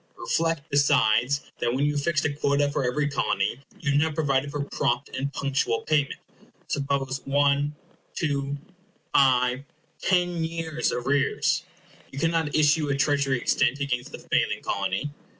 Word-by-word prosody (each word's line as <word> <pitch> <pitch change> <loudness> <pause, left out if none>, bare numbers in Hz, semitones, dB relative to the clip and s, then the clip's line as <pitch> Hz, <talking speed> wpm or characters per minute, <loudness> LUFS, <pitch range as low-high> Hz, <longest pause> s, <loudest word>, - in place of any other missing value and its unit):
Reflect, 165 -2 -1
besides, 140 -2 +3 0.2
that 120 +1 0
when 140 +2 +1
you 145 - +2
have 145 - -1
fixed 155 0 0
a 145 - 0
quota 145 0 +1
for 140 - -1
every 145 +4 0
Colony, 105 -5 0 0.2
you 150 - 0
have 145 +1 +3
not 160 -1 0
provided 140 -3 +1
for 145 0 -3
prompt 125 -2 -1
and 140 +1 -2
punctual 140 -5 0
payment. 145 -3 0 0.5
Suppose 140 -1 -1
one, 145 +1 +2 0.4
two, 140 -2 -1 0.6
five, 125 -1 +3 0.4
ten 175 -2 +1
years' 160 -1 -2
arrears. 140 +3 +1 0.5
You 135 - -10
cannot 165 -1 0
issue 150 0 +3
a 140 - +1
Treasury 140 -1 +2
Extent 125 +3 +1
against 125 -3 -2
the - - -7
failing - - 0
Colony. 100 +9 -2
140 Hz, 150 wpm, -26 LUFS, 135-150 Hz, 0.6 s, besides